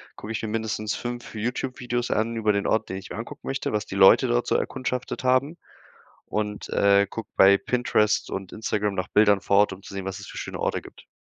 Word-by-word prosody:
gucke 110 - -8
ich 110 - -3
mir 110 - -3
mindestens 110 -1 -2
5 120 0 -6
YouTube 125 +4 -3
Videos 120 -1 -2
an 115 +2 0
über 110 -2 +2
den 100 - -1
Ort, 110 0 +1
den 95 - -4
ich 95 - -9
mir - - -5
angucken 115 - -8
möchte, 135 - -2
was 105 -1 -1
die - - -6
Leute 95 +7 +7
dort 120 0 +1
so - - +1
erkundschaftet 130 -1 -3
haben 130 +6 +2 0.7
und, 105 -1 -3
äh, 100 0 +4
gucke 110 +1 -7
bei 100 +1 +7
Pinterest 110 -2 +1
und 95 -1 -5
Instagram 105 -2 -1
nach 90 -1 -2
Bildern 105 -2 +4
vor 100 - +2
Ort, 105 -1 +4
um 95 - -12
zu - - -11
sehen, 95 -1 -4
was 95 0 -5
es 100 - -9
für - - -10
schöne - - -5
Orte - - -1
gibt. - - -15
110 Hz, 230 wpm, -25 LUFS, 100-120 Hz, 0.7 s, Leute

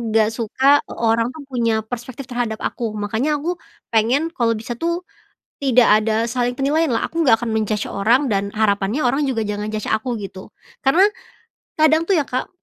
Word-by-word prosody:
gak 215 -1 +5
suka 265 +5 +3
orang 230 0 +1
tuh 310 - -9
punya 230 -3 +1
perspektif 245 +3 -7
terhadap 235 -2 -2
aku 230 -2 -2
makanya 220 +9 -1
aku 350 +4 -2 0.4
pengen 240 +8 +2
kalau 235 -7 +1
bisa 220 +2 -7
tuh, 340 +2 -1 0.6
tidak 250 -3 +4 0.2
ada 220 +1 0
saling 245 0 0
penilaian 295 +3 +1
lah 225 - 0
aku 335 0 -2
gak 225 -4 +4
akan 235 - -2
men-judge 215 -1 -1
orang 230 +8 +2
dan 200 -1 0
harapannya 210 +5 +1
orang 275 +4 +1
juga 255 -5 -1
jangan 210 +1 -3
judge 215 - -3
aku 230 +3 0
gitu 190 0 -9 0.4
karena, 340 +9 +5 0.7
kadang 315 +1 +4
tuh 380 - +4
ya, 290 - +1
Kak, 255 0 -3
240 Hz, 175 wpm, -20 LUFS, 220-275 Hz, 0.7 s, gak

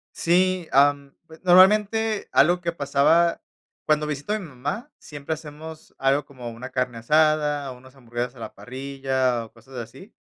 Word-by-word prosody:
Sí, 180 0 +1
am, 140 0 +3 0.3
normalmente, 210 +4 +4
algo 175 +1 +4
que 170 -1 -2
pasaba 160 +3 +2 0.5
cuando 150 0 +2
visito 150 +7 -4
a 215 - 0
mi 190 - -8
mamá, 145 - -5
siempre 145 +1 -6
hacemos 155 +1 -11
algo 135 +2 +2
como 125 -4 -9
una 125 +3 -9
carne 125 -2 -2
asada, 150 +1 +2
o - - -12
unas 130 +2 -17
hamburguesas 120 0 -5
a - - -16
la 110 - -8
parrilla 130 -2 -2
o - - -22
cosas 120 +3 -15
así, 120 - -10
145 Hz, 160 wpm, -24 LUFS, 130-170 Hz, 0.5 s, normalmente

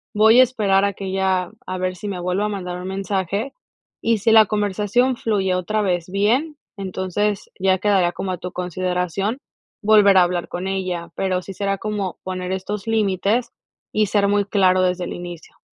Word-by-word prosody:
voy 220 +3 +6
a - - +10
esperar 205 -6 +2
a 200 - 0
que 195 - -7
ella 190 -1 0 0.2
a 185 - -3
ver 185 0 -1
si 205 - -7
me 195 -3 -4
vuelve 180 +3 -1
a 210 - +1
mandar 180 -3 -4
un 185 - -6
mensaje", 195 +4 -2 0.5
y 230 0 +2
si 225 +3 +2
la 220 -2 +7
conversación 210 +5 +1
fluye 195 -5 0
otra 215 +4 -1
vez 180 -2 -1
bien, 240 - +1 0.2
entonces 195 +1 -2
ya 190 0 +3
quedaría 185 -3 +2
como 190 - -4
a 180 - -4
tu 180 0 -6
consideración 180 - -2 0.5
volver 205 -2 +6
a 180 - +7
hablar 175 0 -1
con 180 +2 -4
ella, 185 -3 -3
pero 185 -1 0
sí 195 - -8
será 195 +1 -1
como 205 -3 -3
poner 185 -1 -4
estos 195 +2 -4
límites 220 +2 +1 0.4
y 215 0 +2
ser 200 0 +2
muy 205 0 +2
claro 185 -2 +3
desde 180 0 0
el - - -5
inicio. 175 -2 -9
195 Hz, 185 wpm, -21 LUFS, 185-210 Hz, 0.5 s, a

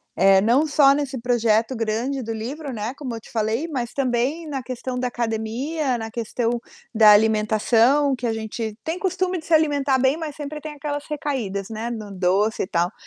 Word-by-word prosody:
eh, 195 +1 +5
não 245 +9 +3
só 285 -2 +5
nesse 280 -2 -2
projeto 230 0 +1
grande 230 +4 -1
do 225 -1 -5
livro, 265 +6 -5
né, 220 +1 -4
como 255 -5 -5
eu 225 - -6
te - - -17
falei, 225 +7 -1
mas 250 -6 -3
também 275 +5 -1
na 275 -3 -3
questão 255 0 -5
da 250 - 0
academia, 245 +5 -2
na 225 -1 -6
questão 235 +1 -2 0.3
da 215 -2 +7
alimentação, 225 +6 +3
que 245 -1 -3
a - - +1
gente 220 0 -5
tem 330 +3 -3
costume 370 -2 -1
de 320 - -13
se 330 - -1
alimentar 290 -3 +3
bem, 260 +2 +3
mas 315 -3 -6
sempre 300 0 -6
tem 305 0 -6
aquelas 290 0 -4
recaídas, 235 -10 -3
né, 225 +1 -4
no 215 -4 -6
doce 195 +4 +1
e - - -5
tal. 175 +3 0
245 Hz, 195 wpm, -23 LUFS, 220-285 Hz, 0.3 s, da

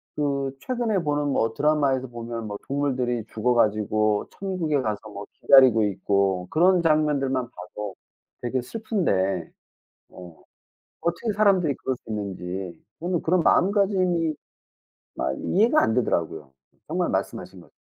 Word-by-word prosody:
그 140 -2 -1
최근에 240 -5 -1
보는 145 -3 -1
뭐 115 -4 0
드라마에서 140 -3 +1
보면 115 -1 -6
뭐 105 -1 -5
동물들이 130 -5 -1
죽어 120 +3 +1
가지고 110 -1 +1
천국에 175 -7 -1
가서 110 -2 -4
뭐 100 0 -8
기다리고 130 -5 +6
있고 100 -2 0
그런 180 +3 +4
장면들만 140 -5 +1
봐도 100 +2 -8 0.5
되게 125 +1 -1
슬픈데 110 - -1 0.6
어 90 -3 -13 0.6
어떻게 170 +7 -1
사람들이 190 -8 +3
그럴 130 - -3
수 - - -45
있는지 95 -4 -5 0.2
저는 175 0 -1
그런 180 +3 +2
마음가짐이 185 -5 +2 0.8
마 65 - -1
이해가 225 - +2
안 110 - +2
되더라고요. 80 - -1 0.3
정말 - - -1
말씀하신 - - -4
것 - - -20
130 Hz, 300 characters per minute, -24 LUFS, 105-165 Hz, 0.8 s, 기다리고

